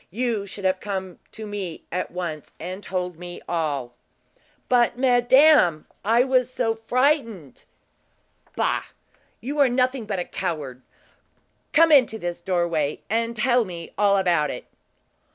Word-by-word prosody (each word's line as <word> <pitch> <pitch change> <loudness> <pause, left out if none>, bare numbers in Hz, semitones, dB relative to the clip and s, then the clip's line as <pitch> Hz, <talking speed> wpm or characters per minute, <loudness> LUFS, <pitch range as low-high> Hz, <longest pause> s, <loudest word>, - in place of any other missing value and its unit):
You 225 -1 -2
should 195 0 -7
have 185 0 +2
come 190 -3 -5
to 220 - -8
me 200 -5 -6
at 180 +1 -2
once, 170 -4 -5
and 185 +4 -6
told 180 -4 -4
me 175 0 -8
all." 145 -7 -2 0.7
"But, 245 -1 +3
madame, 250 - +5 0.2
I 230 +4 +4
was 255 -1 +1
so 225 -3 -1
frightened!" 245 - 0 0.9
"Bah! - - 0 0.6
You 285 +6 -4
are 275 -2 +5
nothing 255 -1 0
but 200 - -2
a 180 - -2
coward. 150 -8 -4 0.9
Come 325 +2 +5
into 255 -6 +5
this 175 -4 -5
doorway, 170 -5 -1
and 230 +1 0
tell 240 +2 +3
me 170 -4 -8
all 200 -1 +3
about 175 -5 +2
it." 125 - -6
200 Hz, 135 wpm, -24 LUFS, 175-245 Hz, 0.9 s, madame